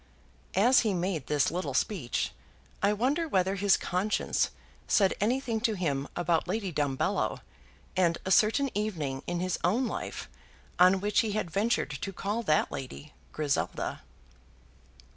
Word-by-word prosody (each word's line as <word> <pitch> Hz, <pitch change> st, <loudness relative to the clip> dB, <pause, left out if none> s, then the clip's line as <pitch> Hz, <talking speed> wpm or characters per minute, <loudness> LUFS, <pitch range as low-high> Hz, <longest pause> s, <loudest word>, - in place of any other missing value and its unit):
As 245 Hz, +7 st, +6 dB
he 215 Hz, -5 st, +1 dB
made 175 Hz, -5 st, -2 dB
this 145 Hz, -2 st, +2 dB
little 165 Hz, -7 st, -3 dB
speech 145 Hz, -, -1 dB, 0.5 s
I 200 Hz, +1 st, +3 dB
wonder 270 Hz, +10 st, 0 dB
whether 190 Hz, -, +1 dB
his 200 Hz, 0 st, +3 dB
conscience 190 Hz, +4 st, 0 dB, 0.4 s
said 195 Hz, -4 st, +4 dB
anything 235 Hz, 0 st, 0 dB
to 225 Hz, -2 st, +1 dB
him 145 Hz, -7 st, -1 dB
about 170 Hz, -1 st, +1 dB
Lady 200 Hz, -4 st, -2 dB
Dumbello, 145 Hz, -3 st, 0 dB, 0.5 s
and 170 Hz, -2 st, +2 dB
a 190 Hz, -, -2 dB
certain 235 Hz, +7 st, +4 dB
evening 160 Hz, -11 st, -2 dB
in 175 Hz, 0 st, -2 dB
his 185 Hz, 0 st, -1 dB
own 225 Hz, +10 st, +2 dB
life, -, -, -5 dB, 0.5 s
on 185 Hz, +1 st, +6 dB
which 210 Hz, 0 st, +2 dB
he 215 Hz, -2 st, +1 dB
had 195 Hz, -5 st, -2 dB
ventured 205 Hz, -5 st, +1 dB
to 150 Hz, +8 st, -4 dB
call 205 Hz, +4 st, -2 dB
that 155 Hz, -9 st, +2 dB
lady, 140 Hz, +2 st, -7 dB, 0.2 s
Griselda. 150 Hz, -3 st, -2 dB
190 Hz, 140 wpm, -29 LUFS, 160-215 Hz, 0.5 s, As